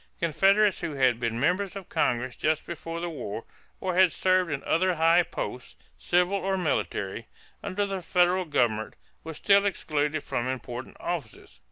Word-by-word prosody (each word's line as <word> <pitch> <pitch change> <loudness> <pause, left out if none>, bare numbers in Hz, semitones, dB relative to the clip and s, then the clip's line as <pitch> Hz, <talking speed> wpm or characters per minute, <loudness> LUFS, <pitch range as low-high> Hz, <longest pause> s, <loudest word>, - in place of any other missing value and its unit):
Confederates 195 +5 +3
who 155 - -3
had 130 -3 +3
been 115 -1 -2
members 180 +8 0
of 195 -3 -7
Congress 125 0 0
just 155 0 0
before 165 0 -6
the 175 - -3
war, 115 -7 -5 0.4
or 185 -1 -2
had 185 -1 +5
served 185 0 +2
in 145 -2 -3
other 185 +2 +2
high 165 +2 +5
posts, 125 -6 -6 0.2
civil 180 - +1
or 195 0 -1
military, 115 - -2 0.3
under 200 +1 -1
the 195 -2 -4
federal 180 +2 +2
government, 115 -8 0 0.3
were 160 -1 -7
still 200 +5 +4
excluded 155 -6 -1
from 120 - -2
important 125 -1 -5
offices. - - -6
165 Hz, 160 wpm, -27 LUFS, 130-185 Hz, 0.4 s, had